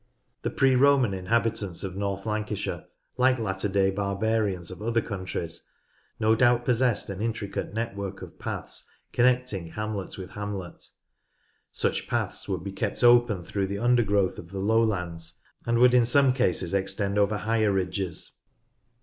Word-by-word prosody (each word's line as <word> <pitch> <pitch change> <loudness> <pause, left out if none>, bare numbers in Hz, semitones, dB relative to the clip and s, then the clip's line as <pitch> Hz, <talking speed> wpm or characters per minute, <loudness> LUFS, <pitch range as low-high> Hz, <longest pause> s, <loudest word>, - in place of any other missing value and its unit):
The - - -1
pre 135 -1 +3
Roman 135 -4 +4
inhabitants 100 -1 -1
of 95 -2 -5
North 100 0 -3
Lancashire, 105 -1 -3 0.3
like 130 0 +4
latter 100 -3 -2
day 95 0 +2
barbarians 100 -2 -1
of 95 - -9
other 115 +1 +1
countries, 90 -5 -5 0.5
no 110 +1 +4
doubt 120 +1 +3
possessed 125 -2 +2
an 100 +1 -6
intricate 105 -3 -3
network 100 -4 -4
of - - -12
paths - - -6 0.2
connecting 125 -7 +2
hamlet 105 +1 -5
with 95 -1 -8
hamlet. 100 -4 -6 0.9
Such - - -1
paths - - -2
would 85 - -2
be 100 - -5
kept 105 +4 -3
open 120 -6 +5
through 95 +3 -2
the 100 +1 -3
undergrowth 105 -5 +2
of 85 - -10
the 95 - -7
lowlands, 95 -6 0 0.3
and 115 0 +2
would 125 +1 +6
in 125 -2 +5
some 135 +2 +5
cases 95 -8 +1
extend 100 +1 0
over 105 +1 +2
higher 110 +1 +1
ridges. 95 -1 -2
105 Hz, 150 wpm, -27 LUFS, 95-115 Hz, 0.9 s, would